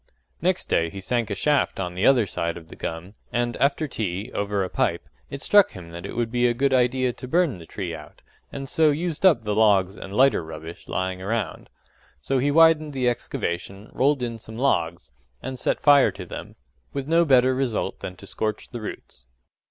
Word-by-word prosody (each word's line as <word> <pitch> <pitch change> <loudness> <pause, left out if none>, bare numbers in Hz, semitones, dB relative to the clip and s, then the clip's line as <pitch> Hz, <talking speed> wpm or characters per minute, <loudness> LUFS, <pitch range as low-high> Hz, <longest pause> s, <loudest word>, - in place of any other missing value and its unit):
Next - - +1
day 85 0 +1
he 100 - -8
sank 115 +3 -1
a 100 - -2
shaft 145 +4 +1
on 90 -2 -3
the 95 +4 +1
other 125 -5 +5
side 85 -2 -3
of 80 -1 -12
the - - -11
gum; 85 +4 -6 0.2
and 120 0 -1
after 140 +3 +1
tea, 105 -2 -4
over 100 -1 -1
a - - -2
pipe, - - -1 0.2
it 140 - -6
struck 205 -1 +5
him 90 -4 -10
that 85 +3 -7
it - - -8
would 115 -1 -1
be 125 0 +2
a 120 - 0
good 135 +2 +1
idea 125 0 +2
to 125 - -9
burn 160 - +1
the 80 - -12
tree 90 -2 -5
out, 75 -2 -11 0.3
and 135 -1 -6
so 155 +2 +3
use 160 +3 -2
up 160 -12 +5
the 105 -1 -1
logs 100 -3 +3
and 95 -1 -8
lighter 135 -6 +4
rubbish 80 +1 -9
lying 95 0 -2
round. 100 -3 -3 0.5
So 135 -1 0
he 140 +3 +1
widened 155 -1 +5
the 130 -2 0
excavation, 100 -3 -3
rolled 140 -1 +2
in 115 -1 -4
some 110 0 -10
logs, 85 -11 0 0.3
and 130 -1 -6
set - - 0
fire 145 -2 +6
to - - -8
them - - -8 0.4
with 140 -1 -4
no 165 +2 +4
better 130 -4 +4
result 130 -4 -2
than 90 - -6
to 100 - -13
scorch 110 +2 -3
the 120 -2 -6
roots. 65 - -9
120 Hz, 205 wpm, -24 LUFS, 95-135 Hz, 0.5 s, fire